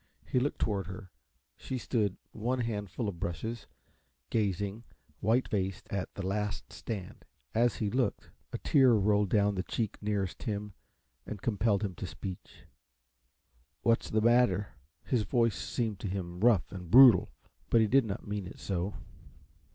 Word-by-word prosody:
He 125 Hz, -, +1 dB
looked 140 Hz, +3 st, -1 dB
toward 100 Hz, -4 st, -1 dB
her; 95 Hz, 0 st, -9 dB, 0.5 s
she 130 Hz, -, -4 dB
stood, 105 Hz, -6 st, 0 dB
one 125 Hz, +4 st, -1 dB
hand 105 Hz, -4 st, -3 dB
full 115 Hz, +2 st, -3 dB
of 90 Hz, -4 st, -5 dB
brushes, 110 Hz, +8 st, -4 dB, 0.6 s
gazing, 100 Hz, 0 st, -1 dB, 0.4 s
white 115 Hz, +5 st, +2 dB
faced, 95 Hz, -2 st, -2 dB
at 100 Hz, -2 st, -2 dB
"The 100 Hz, -, -4 dB
Last 105 Hz, +2 st, -3 dB
Stand." 100 Hz, -5 st, -6 dB, 0.3 s
As 120 Hz, 0 st, +3 dB
he 105 Hz, -2 st, -2 dB
looked, 130 Hz, 0 st, -1 dB, 0.2 s
a -, -, -3 dB
tear 130 Hz, -4 st, +4 dB
rolled 105 Hz, -1 st, +2 dB
down 105 Hz, 0 st, +3 dB
the 95 Hz, -, -1 dB
cheek 110 Hz, +2 st, -3 dB
nearest 100 Hz, -3 st, -2 dB
him 105 Hz, -2 st, -3 dB, 0.5 s
and 105 Hz, -, -5 dB
compelled 105 Hz, 0 st, +1 dB
him 100 Hz, -3 st, -2 dB
to -, -, -6 dB
speech. 95 Hz, -2 st, -8 dB, 1.2 s
"What's 115 Hz, 0 st, +2 dB
the 110 Hz, -, +1 dB
matter?" 115 Hz, -4 st, +3 dB, 0.3 s
His 125 Hz, -4 st, +1 dB
voice 115 Hz, +2 st, +2 dB
seemed 110 Hz, -5 st, -2 dB
to 105 Hz, -, -4 dB
him 90 Hz, -2 st, -4 dB
rough 110 Hz, -4 st, +3 dB
and 90 Hz, -3 st, -8 dB
brutal, 120 Hz, -4 st, +8 dB, 0.4 s
but 115 Hz, -, +5 dB
he 110 Hz, -, +5 dB
did 130 Hz, +3 st, +4 dB
not 100 Hz, -2 st, -5 dB
mean 100 Hz, -2 st, -3 dB
it -, -, -11 dB
so. 95 Hz, +1 st, -2 dB
105 Hz, 160 wpm, -31 LUFS, 95-115 Hz, 1.2 s, brutal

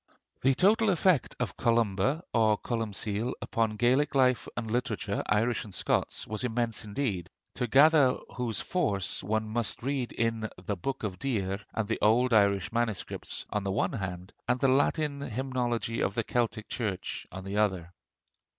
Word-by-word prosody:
The 135 Hz, +1 st, +3 dB
total 215 Hz, -, +4 dB
effect 175 Hz, -7 st, +2 dB
of -, -, -2 dB
Columba, 115 Hz, -, +1 dB
or 110 Hz, -2 st, +4 dB
Columcill, 110 Hz, 0 st, -2 dB
upon 110 Hz, -2 st, -1 dB
Gaelic 130 Hz, +7 st, +2 dB
life 125 Hz, -6 st, +3 dB
and 115 Hz, -3 st, -3 dB
literature, 120 Hz, +2 st, -1 dB
Irish 115 Hz, +2 st, +1 dB
and 105 Hz, -, -11 dB
Scots, -, -, -1 dB
was 110 Hz, +3 st, -4 dB
immense 115 Hz, -2 st, -1 dB
indeed; 100 Hz, -, -2 dB, 0.2 s
to 125 Hz, 0 st, -2 dB
gather 140 Hz, +1 st, +6 dB, 0.2 s
whose 120 Hz, -5 st, -2 dB
force 125 Hz, -, -1 dB
one 110 Hz, +3 st, -1 dB
must 115 Hz, +1 st, -2 dB
read 135 Hz, -2 st, -1 dB
in 115 Hz, -1 st, -1 dB, 0.2 s
the 105 Hz, -, -1 dB
'Book 130 Hz, +9 st, -4 dB
of 95 Hz, -4 st, -3 dB
Deer' 100 Hz, -7 st, -1 dB
and 110 Hz, -2 st, -1 dB
the 115 Hz, -, -1 dB
old 120 Hz, +3 st, +4 dB
Irish 100 Hz, -1 st, +3 dB
MSS. 115 Hz, -3 st, -2 dB
on 105 Hz, -1 st, -1 dB
the 100 Hz, -, -1 dB
one 100 Hz, -, 0 dB
hand, 95 Hz, -2 st, -5 dB
and 125 Hz, -, +2 dB
the 135 Hz, -, +3 dB
Latin 145 Hz, +2 st, +1 dB
hymnology 120 Hz, -2 st, -2 dB
of 100 Hz, -, 0 dB
the 115 Hz, -, 0 dB
Celtic 115 Hz, -3 st, -1 dB
church 105 Hz, -6 st, -4 dB
on 95 Hz, 0 st, -7 dB
the 100 Hz, +2 st, -4 dB
other. 95 Hz, -5 st, 0 dB
115 Hz, 160 wpm, -29 LUFS, 105-130 Hz, 0.2 s, gather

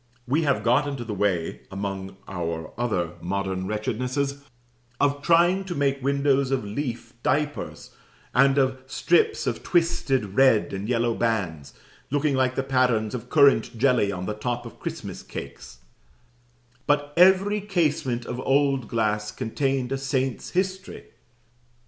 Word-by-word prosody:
We 145 Hz, +6 st, +2 dB
have 145 Hz, -3 st, +1 dB
got 125 Hz, +5 st, +3 dB
into 140 Hz, -4 st, -4 dB
the 110 Hz, -2 st, -5 dB
way, 95 Hz, -5 st, -1 dB
among 95 Hz, -1 st, -5 dB
our 85 Hz, -3 st, -4 dB
other 105 Hz, -9 st, -1 dB
modern 95 Hz, +1 st, -2 dB
wretchednesses, 125 Hz, +7 st, -2 dB, 0.6 s
of 145 Hz, 0 st, +1 dB
trying 175 Hz, +4 st, +4 dB
to 180 Hz, -2 st, -4 dB
make 140 Hz, -1 st, 0 dB
windows 140 Hz, -1 st, +2 dB
of 135 Hz, -5 st, -1 dB
leaf 115 Hz, +1 st, -4 dB
diapers, 145 Hz, +2 st, -2 dB, 0.4 s
and 135 Hz, +2 st, +4 dB
of 130 Hz, -1 st, +2 dB
strips 435 Hz, -, +2 dB
of -, -, -2 dB
twisted 135 Hz, -, +1 dB
red 130 Hz, -7 st, +4 dB
and 100 Hz, +3 st, -4 dB
yellow 120 Hz, -1 st, +1 dB
bands, 95 Hz, -12 st, -2 dB, 0.3 s
looking 145 Hz, +1 st, +1 dB
like 130 Hz, -1 st, +1 dB
the 135 Hz, -, 0 dB
patterns 125 Hz, -5 st, +1 dB
of 125 Hz, -3 st, -6 dB
currant 140 Hz, -6 st, +4 dB
jelly 125 Hz, -5 st, +3 dB
on 90 Hz, -1 st, -4 dB
the 105 Hz, -, -2 dB
top 120 Hz, +3 st, -3 dB
of -, -, -11 dB
Christmas -, -, -6 dB
cakes; -, -, -9 dB, 1.1 s
but 145 Hz, 0 st, +1 dB
every 190 Hz, +3 st, +5 dB
casement 150 Hz, -, 0 dB
of 125 Hz, +1 st, -5 dB
old 135 Hz, -2 st, +1 dB
glass 105 Hz, -2 st, 0 dB
contained 130 Hz, +2 st, -2 dB
a 135 Hz, -, -1 dB
saint's 135 Hz, -2 st, -2 dB
history. 185 Hz, +1 st, -3 dB
130 Hz, 140 wpm, -25 LUFS, 105-145 Hz, 1.1 s, every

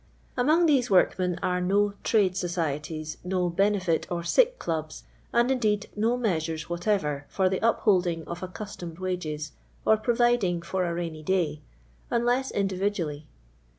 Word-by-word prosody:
Among 305 Hz, +7 st, +3 dB
these 270 Hz, -6 st, +3 dB
workmen 180 Hz, -2 st, +3 dB
arc 180 Hz, 0 st, 0 dB
no 200 Hz, +2 st, +2 dB
Tixute 205 Hz, -5 st, +3 dB
SocUtUs, 160 Hz, -4 st, -3 dB
no 180 Hz, -1 st, 0 dB
liturjit 185 Hz, -2 st, +2 dB
(tr -, -, -4 dB
SicL -, -, +2 dB
Civls, 155 Hz, -2 st, -3 dB, 0.3 s
and, 240 Hz, +2 st, +3 dB
indeed, 215 Hz, -5 st, 0 dB
no 225 Hz, +4 st, +1 dB
measures 160 Hz, -9 st, -1 dB
\v'}jatc\er 170 Hz, -5 st, -1 dB
for 190 Hz, -1 st, +1 dB
the 185 Hz, 0 st, 0 dB
uphcUJing 180 Hz, -7 st, +2 dB
of 170 Hz, 0 st, -6 dB
accustomed 185 Hz, -3 st, -7 dB
wn^es, 160 Hz, -5 st, -3 dB, 0.3 s
or 220 Hz, -, +5 dB
]»roviding 230 Hz, -6 st, +2 dB
for 185 Hz, +1 st, -1 dB
a 170 Hz, -, -1 dB
rainy 165 Hz, -2 st, -4 dB
day," 155 Hz, -3 st, 0 dB, 0.5 s
unless 245 Hz, +3 st, +1 dB
individu 195 Hz, +1 st, 0 dB
ally. 150 Hz, -3 st, -3 dB
185 Hz, 140 wpm, -27 LUFS, 170-215 Hz, 0.5 s, or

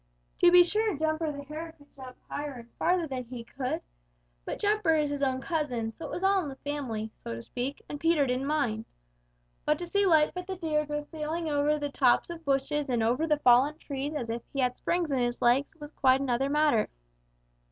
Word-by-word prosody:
To 355 Hz, -, +7 dB
be 355 Hz, 0 st, +9 dB
sure 420 Hz, 0 st, 0 dB
Jumper 315 Hz, 0 st, 0 dB
the 285 Hz, -1 st, -7 dB
Hare 315 Hz, +3 st, -7 dB
could 285 Hz, -1 st, -22 dB
jump 260 Hz, -2 st, -10 dB
higher 290 Hz, -1 st, -4 dB
and 235 Hz, -2 st, -12 dB
farther 350 Hz, 0 st, +2 dB
than 260 Hz, -4 st, -4 dB
he 235 Hz, 0 st, -7 dB
could, 255 Hz, +2 st, -3 dB, 0.6 s
but -, -, -4 dB
Jumper 415 Hz, -5 st, +2 dB
is 300 Hz, -2 st, +1 dB
his 285 Hz, -1 st, -3 dB
own 260 Hz, -1 st, +1 dB
cousin, 255 Hz, -9 st, -2 dB
so 330 Hz, -, -8 dB
it -, -, -6 dB
was 360 Hz, -, -4 dB
all 390 Hz, 0 st, +4 dB
in 300 Hz, -, -4 dB
the 270 Hz, -, -7 dB
family, 255 Hz, -7 st, -4 dB
so 115 Hz, -, -4 dB
to 115 Hz, -, -8 dB
speak, 255 Hz, -, -4 dB
and 290 Hz, -, -6 dB
Peter 325 Hz, -3 st, +3 dB
didn't 255 Hz, +1 st, -1 dB
mind. 250 Hz, -8 st, 0 dB, 0.8 s
But 300 Hz, -, +2 dB
to 350 Hz, -, -5 dB
see 400 Hz, +3 st, +2 dB
Lightfoot 340 Hz, +2 st, +3 dB
the 380 Hz, -, -3 dB
Deer 310 Hz, -4 st, -1 dB
go 295 Hz, 0 st, -2 dB
sailing 315 Hz, +2 st, -4 dB
over 295 Hz, +1 st, +2 dB
the 290 Hz, -1 st, -3 dB
tops 260 Hz, +4 st, +3 dB
of 340 Hz, -, -6 dB
the 325 Hz, -, -29 dB
bushes 280 Hz, +1 st, 0 dB
and 240 Hz, -3 st, +1 dB
over 250 Hz, +8 st, +1 dB
the 300 Hz, -1 st, +3 dB
fallen 270 Hz, +2 st, +4 dB
trees 285 Hz, -1 st, -4 dB
as 240 Hz, -6 st, -3 dB
if 235 Hz, +1 st, -3 dB
he 275 Hz, -, -4 dB
had 250 Hz, -1 st, +1 dB
springs 340 Hz, -3 st, -1 dB
in 270 Hz, -, +1 dB
his 240 Hz, 0 st, 0 dB
legs 250 Hz, +6 st, +2 dB
was 295 Hz, -2 st, -10 dB
quite 260 Hz, -3 st, +3 dB
another 270 Hz, 0 st, 0 dB
matter. 295 Hz, -6 st, +3 dB
290 Hz, 220 wpm, -29 LUFS, 255-320 Hz, 0.8 s, be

